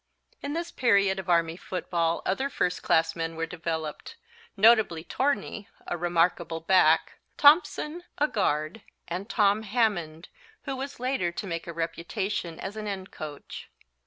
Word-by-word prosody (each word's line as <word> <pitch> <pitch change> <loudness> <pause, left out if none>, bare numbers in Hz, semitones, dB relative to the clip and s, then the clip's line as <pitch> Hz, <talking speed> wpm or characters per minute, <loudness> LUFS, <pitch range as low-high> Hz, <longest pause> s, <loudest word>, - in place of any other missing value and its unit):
In 285 - -4
this 340 +1 -3
period 200 -5 +3
of 190 -1 -7
Army 165 -1 +3
football 170 -2 -2
other 265 +9 0
first 180 -8 -1
class 160 0 +2
men 165 -1 -3
were 165 0 -2
developed, 160 -2 -5 0.4
notably 210 -6 +5
Torney, 260 -4 -2 0.2
a - - -2
remarkable 170 -1 +1
back, 185 +3 +3 0.2
Thompson, 310 +2 +4
a 295 - +3
guard, 175 - -1 0.3
and 185 +5 -5
Tom 205 -1 +3
Hammond, 195 -8 -1 0.3
who 270 -2 -3
was 275 +1 -6
later 250 -9 0
to 205 - -5
make 170 -3 -4
a - - -4
reputation 170 +2 -3
as 195 +2 -5
an 215 -1 -5
end 195 -2 -5
coach. 150 -2 -8
185 Hz, 145 wpm, -27 LUFS, 165-220 Hz, 0.4 s, notably